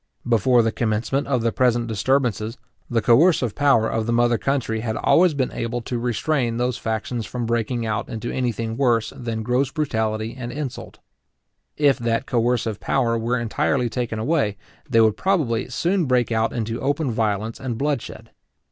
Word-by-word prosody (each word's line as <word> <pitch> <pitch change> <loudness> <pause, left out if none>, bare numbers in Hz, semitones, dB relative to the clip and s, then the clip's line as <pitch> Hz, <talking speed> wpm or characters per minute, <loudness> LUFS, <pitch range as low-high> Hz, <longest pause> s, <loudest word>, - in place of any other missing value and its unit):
Before 120 +1 +4
the 115 - +1
commencement 115 +5 -1
of 125 -4 0
the 115 - +2
present 120 -1 +2
disturbances, 115 -1 0 0.3
the 115 -2 0
coercive 125 - +4
power 140 -6 +3
of 110 0 -2
the - - 0
mother 120 0 +2
country 130 -5 -1
had 110 -1 -3
always 175 -2 +4
been 130 -2 0
able 115 +1 -3
to 120 +1 -3
restrain 120 +1 0
those 125 0 0
factions 115 +1 -3
from 120 -2 -4
breaking 115 +1 -1
out 105 -2 -2
into 115 0 -4
any 125 -2 0
thing 115 0 -4
worse 120 -5 +1
than 115 -2 -4
gross 125 +3 +1
brutality 110 -7 -2
and 120 -2 -6
insult. 140 -2 -6 0.8
If 145 -3 +3
that 115 +2 0
coercive 120 -4 0
power 120 -4 +1
were 115 +2 0
entirely 120 +2 0
taken 120 -3 -2
away, 110 -3 0 0.3
they 115 - +4
would 110 -1 +3
probably 150 - 0
soon 170 +8 0
break 125 -3 +1
out 115 0 +1
into 115 0 -3
open 140 0 0
violence 110 0 -1
and 125 -3 -4
bloodshed. 115 -5 -3
120 Hz, 170 wpm, -22 LUFS, 115-130 Hz, 0.8 s, Before